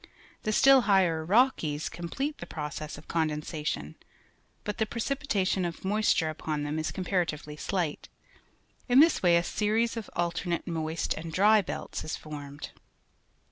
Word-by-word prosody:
The 215 - -1
still 270 +4 +6
higher 175 -5 +3
Rockies 170 - +2
complete 270 - -4
the 175 - -7
process 150 -1 -5
of 150 - -14
condensation, 150 - -2 0.7
but 210 +2 -4
the 220 - +1
precipitation 230 -6 -1
of 170 +1 -4
moisture 195 -5 +2
upon 155 -1 -3
them 150 +2 -2
is 155 - -2
comparatively 170 -5 -2
slight. 170 -1 -2 0.8
In 250 +2 +6
this 325 +2 +5
way 175 -2 +5
a 170 - +1
series 220 +5 0
of 220 - -5
alternate 170 0 -1
moist 160 -1 -2
and 160 +1 -6
dry 210 +5 +5
belts - - -5
is 155 - -4
formed. 145 -2 -8
175 Hz, 140 wpm, -29 LUFS, 155-210 Hz, 0.8 s, still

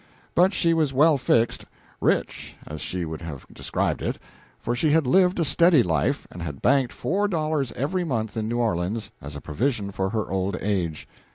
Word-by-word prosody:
But 180 +2 +4
she 170 -4 +2
was 155 -4 +1
well 150 +4 +5
fixed 115 -2 +2 0.4
rich, - - -1
as 75 0 -7
she 90 -2 -3
would 80 0 -6
have 75 -6 -7
described - - -2
it; - - -2 0.4
for 120 - -2
she 150 +5 +1
had 155 0 +3
lived 180 +6 +3
a 165 - +2
steady 170 -4 +5
life, 80 -5 0
and 85 - -8
had 75 -5 -5
banked 135 -2 +3
four 205 +4 0
dollars 155 - -1
every 175 +8 -1
month 115 -9 -2
in 110 -1 -2
New 120 - -1
Orleans 105 -1 -1
as 70 0 -7
a 70 - -7
provision 100 - -1
for 95 0 -1
her 110 0 -1
old 95 +1 -1
age. 90 -6 -2
115 Hz, 190 wpm, -25 LUFS, 90-155 Hz, 0.4 s, well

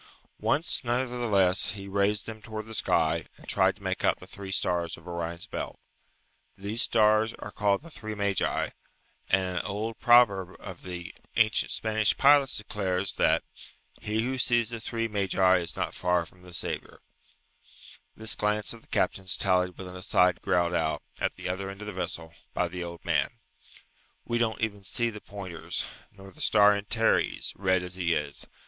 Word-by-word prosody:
Once 160 -1 +1
nevertheless 120 -7 +2
he 100 -2 -8
raised 100 +1 +1
them 110 -1 -8
towards 110 0 -6
the 110 - -8
sky, 80 -5 +1
and - - -16
tried - - +3
to - - -19
make - - -2
out - - +3
the - - -11
three 100 -1 -8
stars 85 -3 0
of 85 +1 -15
Orion's 85 0 -4
belt. - - -5 0.8
These 105 +4 -2
stars 110 -1 +4
are 105 - -8
called 100 +5 +1
the 165 - -12
three 110 -6 -6
magi, 100 -2 0 0.6
and 95 - +4
an 90 -1 -2
old 105 +3 -4
proverb 100 -7 +5
of 95 -4 -9
the 90 -2 -7 0.2
ancient 110 -1 +3
Spanish 110 -1 +1
pilots 140 -1 +5
declares 100 -3 -1
that, - - +3 0.6
"He 110 0 0
who 130 +2 -2
sees 120 -1 +2
the 115 - -4
three 115 +1 -2
magi 95 -3 +3
is 85 - -2
not - - -2
far 90 -1 +1
from 90 +2 -18
the 90 -1 -9
Saviour." - - -4 1.1
This 110 0 0
glance 105 +1 0
of 115 - -12
the - - -22
captain's 95 -1 0
tallied 90 -1 +2
with 95 - -7
an 90 - -9
aside 90 -1 +2
growled 85 -1 +2
out, 80 -2 0 0.2
at - - 0
the - - -6
other 95 +2 -3
end 100 0 -8
of - - -6
the 105 - -5
vessel, 85 -3 -3 0.2
by 90 - +1
the 90 +1 -5
old 85 0 -8
man, - - +1 0.9
"We 120 0 0
don't 115 -1 0
even 105 -3 -2
see 120 +4 0
the 105 -1 -9
pointers, 95 -5 -5 0.3
nor 95 -1 -13
the - - -12
star 105 -1 +6
Antares, 110 +3 +1
red 95 -2 +2
as 90 0 -5
he 85 -2 +1
is. 75 -1 -3
100 Hz, 180 wpm, -28 LUFS, 90-110 Hz, 1.1 s, star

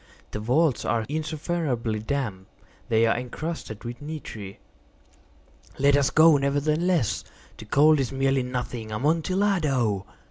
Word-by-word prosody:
The - - -4
vaults 130 +5 +2
are 115 0 0
insufferably 150 -7 -2
damp. 110 -5 -3 0.4
They 115 0 +4
are 115 - +2
encrusted 125 -2 -5
with 120 +2 -7
nitre." 125 -10 -7 1.2
"Let 140 +1 +4
us 140 -2 +3
go, 160 -1 +6
nevertheless. 150 - +1 0.3
The - - -11
cold 150 +7 +4
is 135 - -1
merely 135 0 +1
nothing. 125 -3 -4
Amontillado! 150 - +1
135 Hz, 115 wpm, -25 LUFS, 115-155 Hz, 1.2 s, go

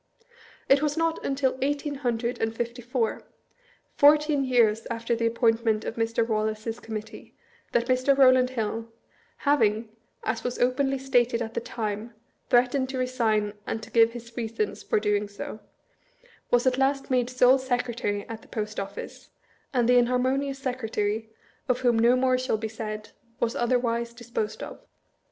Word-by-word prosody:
It 275 +1 +5
was 300 0 0
not 330 0 0
until 270 -1 0
eighteen 290 +2 -1
hundred 240 -1 -1
and 225 0 -1
fifty 235 +1 -4
four, 240 -1 -1 0.7
fourteen 295 0 +5
years 230 -4 +2
after 230 +1 -1
the 230 0 +1
appointment 225 -2 +1
of - - -4
Mr. 230 0 0
Wallace's 220 +1 -2
Committee, 220 -1 -8 0.4
that 235 - +2
Mr. 255 +2 +3
Eowland 255 -1 +5
HiU 225 0 -2 0.6
(having, 225 -6 +2 0.3
as 225 - -2
was 245 - -3
openly 270 +2 +1
stated 245 -3 +2
at 225 -1 -4
the - - -1
time, 215 0 -4 0.3
threatened 255 +2 +3
to 265 - -4
resign 225 -5 0
and 225 - -3
to 230 - -11
give 230 0 +5
his 235 -1 -10
reasons 225 -3 -3
for - - +1
doing 210 0 0
so), 205 +1 -7 0.9
was 245 +1 +3
at 260 0 +2
last 270 0 +1
made 250 -1 +2
sole 255 +1 +5
Secretary 245 -5 -2
at 225 -1 -7
the - - -18
Post 215 -1 -4
Office, 195 0 -7 0.4
and 245 -3 +2
the 245 0 +6
inharmonious 260 +3 +1
secretary 225 -4 -2 0.4
(of 250 0 +1
whom 240 -3 +3
no 235 +2 +5
more 255 0 +2
shall 255 -3 0
be 220 +1 -3
said) 215 -1 -6 0.3
was 230 - 0
otherwise 235 -1 0
disposed 235 -3 -4
of. - - -8
240 Hz, 155 wpm, -26 LUFS, 225-255 Hz, 0.9 s, the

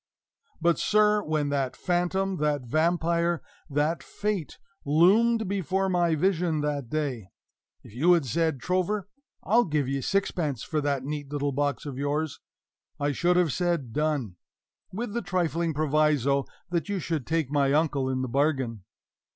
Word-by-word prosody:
But, 170 0 +2
sir, 210 0 +3
when 155 -4 -1
that 135 -2 -1
Phantom, 185 +2 0
that 150 -3 0
Vampire, 170 +4 +1 0.3
that 150 +3 0
Fate, 205 -6 -3 0.3
loomed 205 +9 +4
before 190 0 0
my 175 -3 +2
vision 170 -2 +1
that 145 -4 -2
day, 135 -9 -2 0.6
if - - -14
you 160 +9 +4
had 165 -5 +2
said, 160 +2 0
"Trover, 185 +6 -1 0.4
I'll 235 +4 +4
give 150 -6 0
ye 135 0 -1
sixpence 160 - -1
for 155 -2 -1
this 140 -2 -1
neat 145 0 -5
little 145 -1 -1
box 145 0 -1
of 135 -3 -5
yours," 145 +1 -1 0.6
I 145 0 +1
should 175 +5 +2
have 170 -6 +2
said, 170 -10 -1
"Done!" 145 - -1 0.5
with 210 +2 -4
the 235 - -1
trifling 170 -3 0
proviso 150 -2 +2 0.3
that 175 +3 -1
you 200 - -1
should 160 -6 -3
take 160 -4 0
my 140 -2 +2
uncle 145 -3 +1
in 130 0 -1
the - - -2
bargain. 130 -5 0
155 Hz, 150 wpm, -27 LUFS, 140-180 Hz, 0.6 s, loomed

